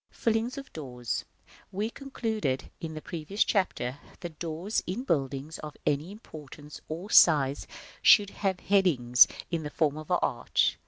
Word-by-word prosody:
1. -, -, -28 dB
Fillings 230 Hz, +4 st, 0 dB
of 275 Hz, -1 st, -9 dB
doors. 125 Hz, -6 st, -4 dB, 0.5 s
We 210 Hz, +4 st, -2 dB
concluded, 220 Hz, -, -3 dB
in 160 Hz, -2 st, -6 dB
the 155 Hz, -, -7 dB
previous 175 Hz, +5 st, -1 dB
Chapter, 145 Hz, -, -1 dB, 0.2 s
that 170 Hz, -4 st, -8 dB
doors 170 Hz, +5 st, -2 dB
in 195 Hz, +8 st, -3 dB
buildings 140 Hz, -, -2 dB
of 150 Hz, -1 st, -8 dB
any 150 Hz, +5 st, 0 dB
importance 150 Hz, -, -11 dB
or 175 Hz, +7 st, -6 dB
size 145 Hz, -4 st, +5 dB, 0.3 s
should 205 Hz, -2 st, +6 dB
have 190 Hz, -3 st, -2 dB
headings 145 Hz, -12 st, +5 dB, 0.2 s
in 165 Hz, -2 st, -1 dB
the 150 Hz, -, -5 dB
form 150 Hz, 0 st, 0 dB
of 155 Hz, -, -10 dB
an -, -, +3 dB
arch. -, -, +1 dB
160 Hz, 155 wpm, -28 LUFS, 145-200 Hz, 0.5 s, should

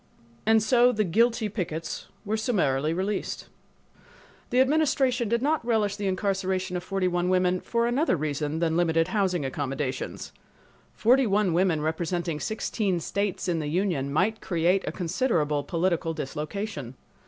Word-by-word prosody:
And 220 Hz, -1 st, +5 dB
so 245 Hz, +1 st, +5 dB
the 215 Hz, -3 st, +1 dB
"guilty" 225 Hz, +4 st, +2 dB
pickets 165 Hz, -6 st, -4 dB, 0.2 s
were 210 Hz, +2 st, 0 dB
summarily 160 Hz, -, +1 dB
released. 190 Hz, +4 st, -3 dB, 1.0 s
The 250 Hz, -, +2 dB
Administration 265 Hz, -4 st, +2 dB
did 235 Hz, +2 st, +1 dB
not 305 Hz, 0 st, +1 dB
relish 220 Hz, -4 st, +1 dB
the 205 Hz, -1 st, -3 dB
incarceration 190 Hz, -1 st, -1 dB
of 175 Hz, -, -3 dB
forty 195 Hz, -1 st, -1 dB
one 175 Hz, 0 st, 0 dB
women 185 Hz, 0 st, +2 dB
for 235 Hz, 0 st, 0 dB
another 245 Hz, -, +1 dB
reason 150 Hz, 0 st, -2 dB
than 165 Hz, -1 st, 0 dB
limited 165 Hz, -1 st, +2 dB
housing 185 Hz, -8 st, 0 dB
accommodations. 135 Hz, 0 st, -4 dB, 0.6 s
Forty 255 Hz, +2 st, +4 dB
one 200 Hz, -3 st, +2 dB
women 175 Hz, -3 st, +2 dB
representing 165 Hz, +1 st, -2 dB
sixteen 210 Hz, -3 st, -1 dB
states 200 Hz, +3 st, -2 dB
in 170 Hz, -2 st, 0 dB
the 150 Hz, -, -3 dB
union 160 Hz, -5 st, 0 dB
might 200 Hz, +9 st, +1 dB
create 175 Hz, +3 st, +1 dB
a -, -, 0 dB
considerable 165 Hz, -, 0 dB
political 165 Hz, +1 st, -1 dB
dislocation. 150 Hz, -, -5 dB
185 Hz, 140 wpm, -26 LUFS, 160-220 Hz, 1.0 s, And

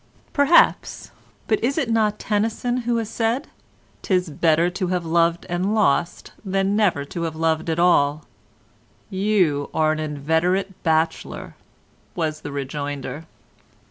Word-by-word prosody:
"Perhaps; 285 Hz, +4 st, +3 dB, 0.3 s
but 215 Hz, -, 0 dB
is 270 Hz, +5 st, 0 dB
it 280 Hz, -6 st, 0 dB
not 220 Hz, -2 st, +1 dB
Tennyson 225 Hz, +4 st, -1 dB
who 235 Hz, -, +2 dB
has 225 Hz, -2 st, -2 dB
said: 235 Hz, +7 st, -1 dB, 0.5 s
''Tis 180 Hz, -2 st, 0 dB
better 165 Hz, +2 st, +2 dB
to 185 Hz, 0 st, -2 dB
have 180 Hz, -1 st, -1 dB
loved 170 Hz, +1 st, +1 dB
and 185 Hz, +5 st, -1 dB
lost, 175 Hz, -4 st, +1 dB
than 195 Hz, 0 st, 0 dB
never 185 Hz, -10 st, +1 dB
to 170 Hz, -, -6 dB
have 165 Hz, -2 st, -3 dB
lost 160 Hz, 0 st, 0 dB
at 160 Hz, -, -1 dB
all'?" 155 Hz, -4 st, +3 dB, 0.9 s
"You 185 Hz, -8 st, +1 dB
are 155 Hz, -1 st, +3 dB
an 155 Hz, -, -2 dB
inveterate 160 Hz, +6 st, -1 dB
bachelor," 160 Hz, 0 st, -1 dB, 0.6 s
was 155 Hz, -2 st, -2 dB
the 145 Hz, -, -7 dB
rejoinder. 140 Hz, +1 st, -5 dB
175 Hz, 135 wpm, -22 LUFS, 155-210 Hz, 0.9 s, Perhaps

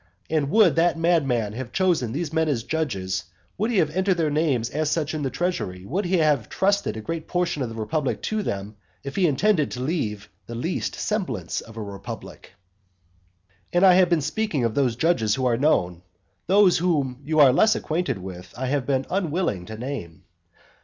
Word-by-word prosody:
And 150 Hz, -3 st, +1 dB
would 185 Hz, -6 st, +4 dB
that 170 Hz, 0 st, +3 dB
madman 135 Hz, -11 st, +1 dB
have 120 Hz, +1 st, -6 dB
chosen 175 Hz, -11 st, +1 dB
these 155 Hz, +4 st, -3 dB
men 160 Hz, -1 st, +1 dB
as 120 Hz, -6 st, -1 dB
judges, 95 Hz, -, -2 dB, 0.3 s
would 215 Hz, +4 st, -1 dB
he 235 Hz, -, 0 dB
have 155 Hz, -3 st, +1 dB
entered 190 Hz, -1 st, +2 dB
their 160 Hz, -3 st, +1 dB
names 140 Hz, -7 st, 0 dB
as 155 Hz, +1 st, 0 dB
such 155 Hz, -1 st, -1 dB
in 155 Hz, -, -3 dB
the 135 Hz, -, -1 dB
treasury, 125 Hz, -, -3 dB
would 180 Hz, -, -2 dB
he 180 Hz, +1 st, +2 dB
have 150 Hz, -8 st, +2 dB
trusted 200 Hz, -, +1 dB
a -, -, -5 dB
great 165 Hz, +8 st, -5 dB
portion 175 Hz, -4 st, -1 dB
of 125 Hz, -, -2 dB
the 115 Hz, -, -8 dB
republic 135 Hz, +6 st, -1 dB
to 215 Hz, 0 st, -1 dB
them, 100 Hz, -, -4 dB, 0.3 s
if 140 Hz, -, -6 dB
he 190 Hz, -, +3 dB
had -, -, +4 dB
intended 160 Hz, +1 st, +2 dB
to 125 Hz, -, -6 dB
leave 110 Hz, -, -2 dB, 0.2 s
the 120 Hz, -, -6 dB
least 165 Hz, +10 st, -2 dB
semblance 130 Hz, -, -2 dB
of 115 Hz, 0 st, -13 dB
a 110 Hz, -, -4 dB
republic? 100 Hz, -1 st, -8 dB
VI. 90 Hz, 0 st, -38 dB
And 175 Hz, +2 st, +5 dB
I 185 Hz, -, +8 dB
have 180 Hz, -1 st, +5 dB
been 170 Hz, -3 st, +2 dB
speaking 155 Hz, -, -1 dB
of 115 Hz, -2 st, 0 dB
those 130 Hz, -3 st, +1 dB
judges 120 Hz, -7 st, +2 dB
who 130 Hz, -, -1 dB
are 120 Hz, -2 st, +3 dB
known. 90 Hz, -, +1 dB, 0.5 s
Those 195 Hz, -1 st, +5 dB
whom 140 Hz, -7 st, 0 dB
you 155 Hz, +2 st, 0 dB
are 135 Hz, -4 st, +7 dB
less 215 Hz, +10 st, +4 dB
acquainted 170 Hz, -, -1 dB
with 95 Hz, -1 st, -9 dB
I 130 Hz, -, -2 dB
have 135 Hz, 0 st, -1 dB
been 135 Hz, -1 st, +1 dB
unwilling 170 Hz, -, -1 dB
to 110 Hz, 0 st, -7 dB
name. 115 Hz, -, -6 dB
145 Hz, 200 wpm, -24 LUFS, 110-170 Hz, 0.5 s, I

